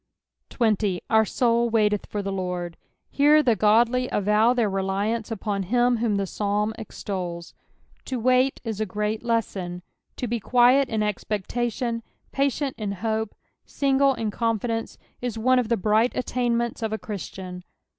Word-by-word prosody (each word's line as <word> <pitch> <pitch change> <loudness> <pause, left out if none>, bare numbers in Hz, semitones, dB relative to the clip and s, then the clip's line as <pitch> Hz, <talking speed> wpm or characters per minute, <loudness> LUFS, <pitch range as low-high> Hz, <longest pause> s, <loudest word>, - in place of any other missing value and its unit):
80. 210 -5 +1
" - - -50
Our 220 0 +5
toul 235 +1 +1
tcaitethfor 210 -2 0
the 195 0 -3
£<>rd." 180 -2 -3 0.4
Hero 300 +2 +5
the 240 -4 +3
godly 235 +5 +3
avow 210 +3 +3
their 240 -3 +2
reliance 200 +4 -1
upon 205 -2 -2
him 240 +5 +2
whom 225 -2 0
the 200 -1 0
Psalm 210 +2 -1
extols. 180 -5 -5 0.5
To 255 -2 -3
wait 255 +3 +2
is 220 -3 -4
a 215 - 0
great 210 +2 -2
lesson. 195 -7 -2 0.3
To - - -3
be 235 0 -2
quiet 250 +4 +4
in 220 -2 -1
expcctatioii, 230 +3 -2 0.3
iMtient 275 0 0
in 210 -2 -2
hope, 220 +2 -2 0.3
single 275 -1 +2
in 220 -3 -2
confidence, 230 0 -2 0.2
is 245 -2 -3
one 255 +3 +3
of 235 -3 -2
the 235 - +2
bright 215 +5 +2
attainments 240 -2 -1
of 220 -1 -2
a 220 - -1
Christian. 185 -4 -7
220 Hz, 150 wpm, -25 LUFS, 205-240 Hz, 0.5 s, Our